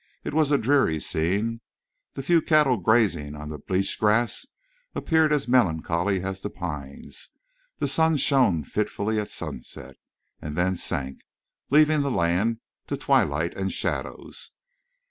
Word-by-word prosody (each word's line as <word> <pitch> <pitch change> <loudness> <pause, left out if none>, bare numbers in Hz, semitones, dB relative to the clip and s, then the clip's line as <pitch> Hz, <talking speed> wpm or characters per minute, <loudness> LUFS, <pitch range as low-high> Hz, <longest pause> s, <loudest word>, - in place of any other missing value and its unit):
It - - -4
was 155 -2 +3
a 145 - +4
dreary 125 - +2
scene. 100 +11 -1 0.5
The 135 - -5
few 170 +3 +4
cattle 150 -5 +3
grazing 95 -8 +2
on 75 0 -7
the 75 -1 -6
bleached 95 +4 -1
grass 110 +3 +2 0.5
appeared 160 -2 +2
as 150 -4 +1
melancholy 90 -4 +1
as 95 0 -4
the 105 - -4
pines. 75 -8 -7 0.5
The - - -1
sun 160 -1 +3
shone 130 - +3
fitfully 105 +5 -1
at 105 - -4
sunset, 65 +2 -7 0.4
and 75 -1 -5
then 95 +1 +1
sank, 70 -6 -3 0.5
leaving 155 +1 +5
the 140 - 0
land 100 +3 +1 0.3
to - - -2
twilight 80 +4 +1
and 95 0 -2
shadows. - - -4
100 Hz, 140 wpm, -25 LUFS, 85-135 Hz, 0.5 s, leaving